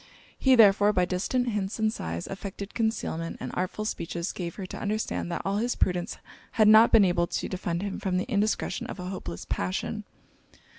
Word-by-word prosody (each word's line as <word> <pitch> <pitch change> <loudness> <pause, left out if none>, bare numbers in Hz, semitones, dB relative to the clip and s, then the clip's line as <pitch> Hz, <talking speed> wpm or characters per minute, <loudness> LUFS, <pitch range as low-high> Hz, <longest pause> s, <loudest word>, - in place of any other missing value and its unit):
He 265 -1 +5
therefore, 205 -2 +6
by 180 -2 +3
distant 240 +8 0
hints 205 -3 -2
and 220 -1 +1
sighs, 85 - -4
affected 195 +1 -7
concealment; 215 -8 -2
and - - -5
artful 185 +4 -2
speeches 170 -3 -3
gave 170 -3 -5
her 195 - -5
to - - -7
understand 210 -4 -2
that 170 - -3
all 195 +1 0
his 240 +3 0
prudence 180 -1 0 0.4
had 215 -2 +4
not 220 +2 +8
been 220 -3 +7
able 175 -1 +2
to - - -3
defend 175 -1 -3
him 200 -1 -4
from 185 -2 -1
the 185 - 0
indiscretion 215 -3 -1
of - - -7
a 180 0 -5
hopeless 90 - -6
passion. 90 0 -2
195 Hz, 190 wpm, -27 LUFS, 175-215 Hz, 0.4 s, not